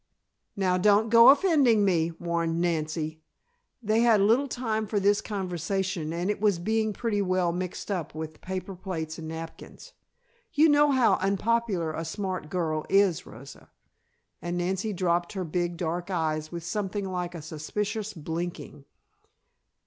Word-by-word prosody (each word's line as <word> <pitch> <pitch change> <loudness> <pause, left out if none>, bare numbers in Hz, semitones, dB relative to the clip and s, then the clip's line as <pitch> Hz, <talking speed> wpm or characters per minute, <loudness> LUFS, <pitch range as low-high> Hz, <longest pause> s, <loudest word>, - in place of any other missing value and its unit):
"Now 185 -2 +1
don't 210 +3 +4
go 230 +1 +9
offending 275 - +5
me," 170 -4 +2
warned 170 -1 -1
Nancy. 160 -2 -2 0.6
They 215 +1 +2
had 230 -3 +5
little 230 +8 +3
time 220 -4 -2
for 205 0 0
this 205 +1 +3
conversation 185 -3 -3
and 175 +4 -1
it 210 - -5
was 205 -4 +3
being 220 +4 0
pretty 210 -1 -1
well 185 -2 +1
mixed 180 +3 -4
up 175 -6 -3
with 155 0 -7
paper 190 +1 -5
plates 170 -4 -5
and 160 - -7
napkins. 160 0 -9 0.6
"You 310 +2 +5
know 295 0 +5
how 260 -3 +4
unpopular 195 -3 0
a 165 - -4
smart 185 -1 -4
girl 155 -3 -1
is, 195 -4 +3
Rosa," 125 +6 -13 0.7
and 175 0 -3
Nancy 190 +4 -1
dropped 175 -2 0
her 190 -2 -3
big 175 +1 -2
dark 175 +2 -3
eyes 155 -3 -1
with 170 -1 -6
something 200 +3 -3
like 180 -1 -4
a 165 - -6
suspicious 205 +7 -3
blinking. 160 -2 -5
185 Hz, 150 wpm, -27 LUFS, 165-210 Hz, 0.7 s, go